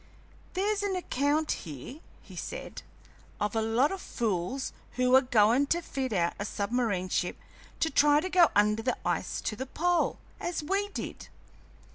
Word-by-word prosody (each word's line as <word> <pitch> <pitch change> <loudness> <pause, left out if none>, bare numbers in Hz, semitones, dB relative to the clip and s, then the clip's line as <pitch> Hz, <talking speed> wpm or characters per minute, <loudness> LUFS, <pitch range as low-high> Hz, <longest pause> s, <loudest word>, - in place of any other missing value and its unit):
"There's 410 +2 +1
an 400 -2 -1
account 300 -2 0
here," 155 - -6 0.2
he - - -13
said, - - -6 0.6
"of 210 +1 -1
a 225 - +2
lot 225 +6 +2
o' 390 - -3
fools 230 - -2 0.2
who 250 +1 +3
are 265 - +8
goin' 245 +2 +4
to 340 - +2
fit 265 -5 -3
out 175 -4 +1
a - - -1
submarine 200 -3 -1
ship 180 0 -1 0.4
to 320 - +2
try 290 +1 +5
to 370 - -2
go 355 -3 +5
under 210 +1 +3
the 250 +2 0
ice - - -1
to 215 - -2
the 260 +5 -5
pole, 350 +5 +1 0.2
as 345 -3 -3
we 390 +6 0
did. - - -6
260 Hz, 165 wpm, -29 LUFS, 215-320 Hz, 0.6 s, are